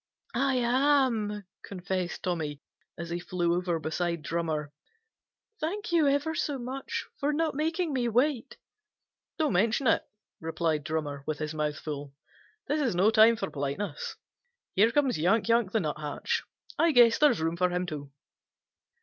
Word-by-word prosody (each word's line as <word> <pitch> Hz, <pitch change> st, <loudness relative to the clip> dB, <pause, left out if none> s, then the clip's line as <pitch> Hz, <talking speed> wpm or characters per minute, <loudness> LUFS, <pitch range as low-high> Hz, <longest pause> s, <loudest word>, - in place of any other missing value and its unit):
"I 270 Hz, +2 st, +1 dB
am," 245 Hz, -4 st, +2 dB, 0.2 s
confessed 185 Hz, -1 st, -4 dB
Tommy, 155 Hz, -5 st, -2 dB, 0.4 s
as 170 Hz, 0 st, -6 dB
he 175 Hz, -, -2 dB
flew 175 Hz, -1 st, 0 dB
over 175 Hz, -1 st, 0 dB
beside 165 Hz, +1 st, -2 dB
Drummer. 155 Hz, -3 st, -2 dB, 0.9 s
"Thank 400 Hz, +6 st, -3 dB
you 325 Hz, -4 st, +4 dB
ever 285 Hz, +3 st, +1 dB
so 290 Hz, -3 st, -1 dB
much 260 Hz, +2 st, -4 dB
for 285 Hz, +1 st, +1 dB
not 315 Hz, +1 st, 0 dB
making 320 Hz, +2 st, -1 dB
me 245 Hz, -3 st, +1 dB
wait." 250 Hz, +1 st, +1 dB, 0.8 s
"Don't 310 Hz, -3 st, +1 dB
mention 225 Hz, +8 st, +2 dB
it," 225 Hz, -, +3 dB, 0.4 s
replied 160 Hz, -2 st, -1 dB
Drummer, 150 Hz, -4 st, -3 dB
with 155 Hz, -, -1 dB
his 155 Hz, 0 st, -4 dB
mouth 150 Hz, -1 st, -1 dB
full. 145 Hz, -2 st, -6 dB, 0.5 s
"This 300 Hz, +1 st, 0 dB
is 250 Hz, -10 st, 0 dB
no 195 Hz, +5 st, +4 dB
time 225 Hz, +1 st, +7 dB
for 230 Hz, -, -4 dB
politeness. 145 Hz, +4 st, -3 dB, 0.6 s
Here 210 Hz, +4 st, +5 dB
comes 270 Hz, -, +2 dB
Yank 200 Hz, +8 st, +2 dB
Yank 230 Hz, -4 st, +3 dB
the 220 Hz, -, +2 dB
Nuthatch. 150 Hz, -3 st, -2 dB, 0.3 s
I 335 Hz, -2 st, +4 dB
guess 235 Hz, -2 st, +6 dB
there 300 Hz, -, +7 dB
is -, -, 0 dB
room 165 Hz, +1 st, 0 dB
for 180 Hz, +1 st, +2 dB
him 180 Hz, 0 st, -1 dB
too." 145 Hz, -5 st, -6 dB
200 Hz, 155 wpm, -29 LUFS, 160-265 Hz, 0.9 s, time